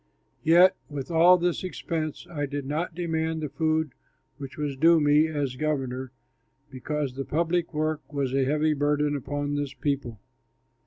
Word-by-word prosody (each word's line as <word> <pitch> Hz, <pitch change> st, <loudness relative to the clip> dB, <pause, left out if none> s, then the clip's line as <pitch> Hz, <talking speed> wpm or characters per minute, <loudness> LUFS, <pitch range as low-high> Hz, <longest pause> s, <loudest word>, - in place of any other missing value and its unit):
Yet 175 Hz, +4 st, +6 dB
with 145 Hz, +2 st, -6 dB
all 170 Hz, +2 st, +6 dB
this 175 Hz, 0 st, -1 dB
expense, 160 Hz, -1 st, -4 dB
I 145 Hz, -4 st, -3 dB
did 140 Hz, 0 st, -4 dB
not 155 Hz, +4 st, -3 dB
demand 160 Hz, -2 st, -1 dB
the 150 Hz, -, -3 dB
food 160 Hz, -1 st, 0 dB, 0.5 s
which 135 Hz, -2 st, -8 dB
was 145 Hz, -2 st, -2 dB
due 165 Hz, +4 st, +5 dB
me 150 Hz, +1 st, +4 dB
as 145 Hz, -5 st, -3 dB
governor, 130 Hz, -4 st, -2 dB, 0.6 s
because 140 Hz, +1 st, -3 dB
the 135 Hz, +1 st, -4 dB
public 170 Hz, +3 st, 0 dB
work 155 Hz, -1 st, -2 dB
was 140 Hz, -3 st, -2 dB
a 135 Hz, 0 st, +2 dB
heavy 150 Hz, +3 st, +2 dB
burden 145 Hz, 0 st, +1 dB
upon 145 Hz, +1 st, -3 dB
this 145 Hz, -1 st, -3 dB
people. 130 Hz, -5 st, -2 dB
150 Hz, 155 wpm, -26 LUFS, 140-160 Hz, 0.6 s, Yet